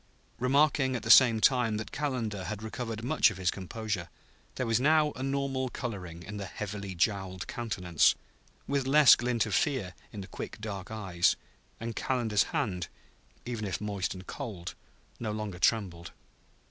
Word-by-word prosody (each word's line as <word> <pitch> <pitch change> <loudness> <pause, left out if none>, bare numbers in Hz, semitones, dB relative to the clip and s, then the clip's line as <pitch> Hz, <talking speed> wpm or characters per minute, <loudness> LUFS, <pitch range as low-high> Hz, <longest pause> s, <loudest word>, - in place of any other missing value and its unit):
remarking 135 +1 +3
at 125 - -4
the 110 - +3
same 120 -4 +8
time 120 -3 +3
that 110 - -5
Calendar 115 -10 -2
had 110 +1 -5
recovered 115 -1 -5
much 135 0 +4
of 110 - -8
his 90 -2 +1
composure. 100 -1 -4 0.5
There 125 - -1
was 115 0 +2
now 150 +2 +4
a 130 - -9
normal 135 -1 -1
coloring 90 -10 -6
in 105 +2 -7
the 100 -1 -5
heavily 100 -2 -5
jowled 95 -1 -1
countenance, 95 - +1 0.5
with 140 -2 -1
less 150 0 +8
glint 120 -2 0
of 105 - -4
fear 130 - 0 0.2
in 105 - -7
the 95 - -8
quick, - - -7
dark 100 -3 -6
eyes; 95 -6 +1 0.4
and 115 0 -5
Calendar's 115 -6 +1
hand, 90 -4 -1 0.6
even 115 -4 -3
if 95 - -2
moist 100 -4 -2
and 95 0 -10
cold, 100 -11 -6 0.5
no 110 -2 -2
longer 105 -4 -4
trembled. 90 -5 0
110 Hz, 160 wpm, -30 LUFS, 95-125 Hz, 0.6 s, same